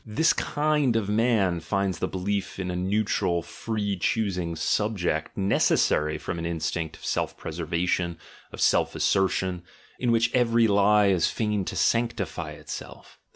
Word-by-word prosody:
This 120 +9 +2
kind 150 -4 +1
of 105 -3 0
man 105 -5 +2
finds 95 +3 -1
the - - 0
belief 100 +1 -3
in 90 -1 -3
a - - -3
neutral, 90 -2 0
free 100 +3 -3
choosing 90 -4 -1
"subject" 90 -5 -1
necessary 80 -5 +2
from 85 - -5
an 85 - -4
instinct 85 -1 -3
of - - -12
self - - -1
preservation, 85 +1 -2 0.3
of - - -10
self - - +2
assertion, 95 -2 +1 0.4
in 120 -2 +1
which 115 0 +2
every 115 -2 +3
lie 100 0 +4
is 90 -4 +3
fain 105 -3 -1
to - - -5
sanctify 115 0 0
itself. - - -9
100 Hz, 145 wpm, -26 LUFS, 90-110 Hz, 0.4 s, lie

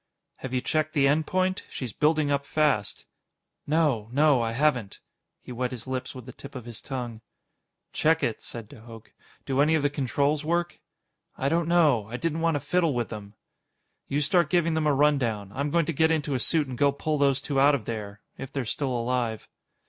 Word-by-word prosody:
"Have 130 - -7
you 130 -1 0
checked 155 +3 -1
the 140 -2 +4
end 150 +2 +2
point? 185 0 0
She's 125 -6 -5
building 150 -1 +2
up 140 0 +1
fast." 140 -8 0 0.6
"No. 145 -8 +1
No. 145 -1 +4
I 115 0 -1
haven't." 125 -6 0 0.4
He - - -10
wet 125 +1 -2
his 120 -3 -7
lips 130 0 -4
with 125 -3 -9
the 125 - -8
tip 140 +3 -12
of 125 -3 -7
his 120 -2 -7
tongue. 120 -4 -5 0.7
"Check 160 +1 +2
it," 115 - -1
said 115 -3 -8
de - - -14
Hooch. 115 -1 -13 0.3
"Do 135 0 +1
any 155 +2 +4
of 155 - 0
the 145 - +2
controls 145 +2 0
work?" 170 +2 -1 0.6
"I 135 - 0
don't 165 +1 +1
know. 150 -11 +3
I 120 +2 -5
didn't 165 +2 -2
want 165 -2 +2
to - - +1
fiddle 170 -4 +1
with 120 -1 -1
them." 105 -1 -8 0.7
"You 145 +2 0
start 170 +1 +3
giving 170 -1 +2
them 160 -1 +1
a - - +4
rundown. 125 -9 +1
I'm 140 +2 -1
going 170 +2 +2
to 165 - -2
get 160 +3 +3
into 155 -3 0
a 130 - 0
suit 155 +3 +1
and 125 -2 -7
go 140 -1 +4
pull 150 +2 -2
those 140 -1 +3
two 140 0 -1
out 140 +1 +6
of 115 -7 -5
there 105 -3 -6 0.2
if 135 -1 -7
they're 135 -3 -3
still 135 +4 -2
alive." 120 -2 -1
140 Hz, 210 wpm, -26 LUFS, 120-155 Hz, 0.7 s, out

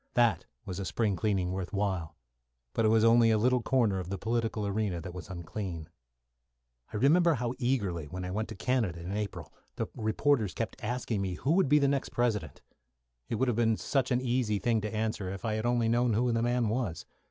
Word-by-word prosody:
That 120 -2 +3 0.2
was 95 -1 -5
a 100 - -3
spring 100 +3 0
cleaning 95 -2 0
worth 95 -1 -4
while. 95 -5 -1 0.6
But 115 - +1
it - - +6
was 110 0 +4
only 115 0 +6
a 110 - +4
little 125 +3 +2
corner 115 -7 +2
of 90 -1 -6
the 100 - -3
political 115 0 -1
arena 100 -3 -1
that 85 +2 -7
was 90 +1 -8
unclean. 85 -2 -5 1.0
I - - -3
remember 165 +7 +4
how 120 -1 -2
eagerly, 100 - -1
when 90 +3 -5
I 90 - -4
went 110 +3 -2
to - - -6
Canada 110 -6 0
in 85 +3 -6
April, 90 -7 -4 0.2
the - - -1
reporters 110 -1 +1
kept 115 +2 -4
asking 120 -2 -2
me 95 -2 -2
who 135 - -1
would 175 -4 +3
be 150 - +6
the 140 -1 +3
next 140 -1 0
President. 120 -4 -1 0.7
It - - 0
would 130 +4 +1
have 120 - +1
been 115 -2 +3
such 135 -3 0
an 125 -1 +1
easy 120 -4 +1
thing 115 +2 +1
to 105 0 -3
answer 110 -3 -2
if 95 +4 -6
I 110 - 0
had 110 +2 -1
only 120 -1 +2
known 120 0 +2
who 120 +3 +2
the 115 0 +1
man 120 -1 +1
was. 110 -8 -2
110 Hz, 215 wpm, -30 LUFS, 95-120 Hz, 1.0 s, it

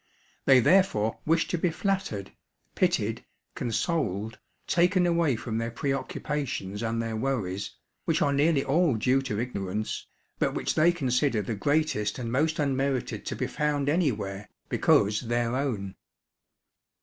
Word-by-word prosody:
They 130 -2 +7
therefore 115 - +3
wish 165 +1 +3
to 175 - -1
be 175 - +2
flattered, 165 - -2 0.4
pitied, - - 0 0.3
consoled, 110 - -2 0.3
taken 180 +1 +3
away 170 -6 +2
from 110 0 -3
their 115 0 -2
preoccupations 135 -4 -3
and 115 0 -1
their 115 -1 -2
worries, 110 -6 -2 0.3
which - - +1
are 140 - +2
nearly 145 0 +3
all 150 0 +2
due 125 +5 +2
to 110 -6 -3
ignorance, 105 -3 -3 0.3
but - - +1
which - - -1
they 165 +3 +5
consider 130 -7 +1
the 115 - -3
greatest 110 -3 0
and 120 -3 -4
most 155 +6 +1
unmerited 135 -3 -1
to - - -2
be - - -2
found 145 -1 0
anywhere, 105 - -1 0.2
because 105 +1 +3
their 120 0 -1
own. 110 -9 -2
130 Hz, 135 wpm, -27 LUFS, 110-150 Hz, 0.4 s, They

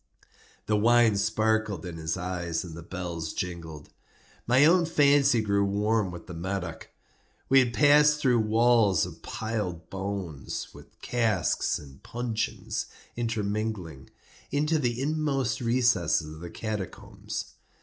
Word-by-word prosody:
The 105 - +1
wine 115 0 +4
sparkled 110 -3 0
in 85 -2 -6
his 80 +1 -2
eyes 90 -2 -3
and 85 -3 -9
the 85 - -8
bells 85 -2 -5
jingled. 85 -4 -6 0.6
My 130 +4 +5
own 170 +1 +5
fancy 140 -6 +4
grew 100 -1 +1
warm 105 +1 +1
with 85 -1 -9
the 90 - -9
Medoc. 90 -1 -4 0.6
We 135 0 +7
had 125 -2 +2
passed 150 +3 +5
through 125 -5 +3
walls 110 -2 +3
of - - -10
piled 105 -7 -4
bones, 95 -7 -5
with - - -16
casks 110 -7 +1
and 70 -2 -13
puncheons 120 -2 -3 0.3
intermingling, 105 - -3 0.4
into 150 +2 +1
the 120 -3 -1
inmost 135 -4 -1
recesses 115 -11 +2
of 80 - -11
the 85 - -7
catacombs. 105 -3 -6
110 Hz, 130 wpm, -27 LUFS, 90-120 Hz, 0.6 s, We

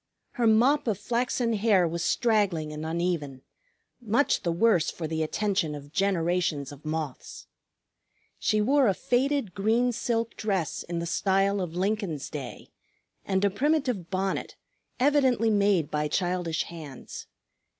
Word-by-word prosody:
Her 240 -3 +1
mop 245 +6 +4
of 215 -4 +1
flaxen 240 +1 -1
hair 205 -4 +3
was 170 +1 -3
straggling 195 -11 +1
and 150 +1 -6
uneven, 160 -5 -2 0.6
much 235 +5 +1
the 170 - -1
worse 170 -3 +3
for 165 - -5
the 160 0 -2
attention 190 -1 -1
of 145 0 -10
generations 175 -6 0
of 145 0 -12
moths. 155 - -5 0.9
She 215 0 +1
wore 270 +4 +3
a 195 - +2
faded 260 -2 0
green 225 +5 +2
silk 230 -1 -2
dress 195 -7 -2
in 170 0 -5
the 170 - -2
style 195 +3 +1
of 175 -2 -5
Lincoln's 190 - -2
day, 140 -4 -7 0.5
and 190 0 +1
a 200 - +2
primitive 255 - 0
bonnet, 190 0 -2 0.4
evidently 260 -4 +3
made 200 -7 +2
by 150 0 0
childish 175 -1 -1
hands. 155 -6 -9
195 Hz, 140 wpm, -27 LUFS, 165-225 Hz, 0.9 s, mop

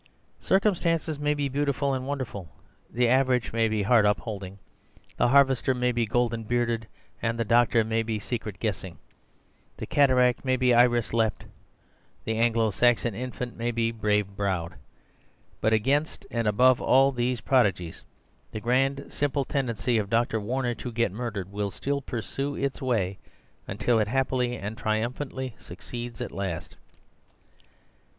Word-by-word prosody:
Circumstances 170 -6 +1
may 150 0 +1
be 145 -1 -1
beautiful 140 0 0
and 130 0 -3
wonderful, 125 - -4 0.4
the 120 +1 +1
average 130 -1 +2
may 115 -1 +2
be 110 -2 0
heart 115 +1 +4
upholding, 100 -2 -2 0.6
the - - +3
harvester 135 -1 +4
may 125 0 +1
be 120 -2 0
golden 115 0 0
bearded, 115 -1 -1 0.3
the 115 0 -1
doctor 115 0 +4
may 110 +1 0
be 110 -1 -2
secret 105 -2 -5
guessing, 95 -6 -4 0.8
the - - -5
cataract 130 -3 +3
may 130 -1 +2
be 125 -1 +3
iris 120 -1 +3
leapt, 115 -2 0 0.8
the 110 - -1
Anglo 115 -1 +2
Saxon 120 +2 +2
infant 125 +2 -5
may 115 +1 -2
be 115 -1 0
brave 105 -3 0
browed, 95 -4 -2 0.9
but 110 - +2
against 135 +8 0
and 115 -2 -1
above 125 +4 +4
all 135 +2 +4
these 125 -1 -1
prodigies 100 -10 +1 0.5
the 110 - -5
grand 135 +4 +1
simple 140 -1 0
tendency 120 -4 0
of 100 -2 -3
Dr. 115 0 +1
Warner 120 +3 -1
to 120 +1 -7
get 115 -3 0
murdered 100 -3 -5
will 100 0 -2
still 140 +8 -3
pursue 135 +3 -4
its 140 0 -3
way 105 -8 -1 0.5
until 105 +4 +1
it 105 - +1
happily 125 0 0
and 105 +2 -5
triumphantly 125 +4 -2
succeeds 120 +6 -8
at 120 - -4
last." 95 -5 -5
120 Hz, 145 wpm, -26 LUFS, 110-130 Hz, 0.9 s, heart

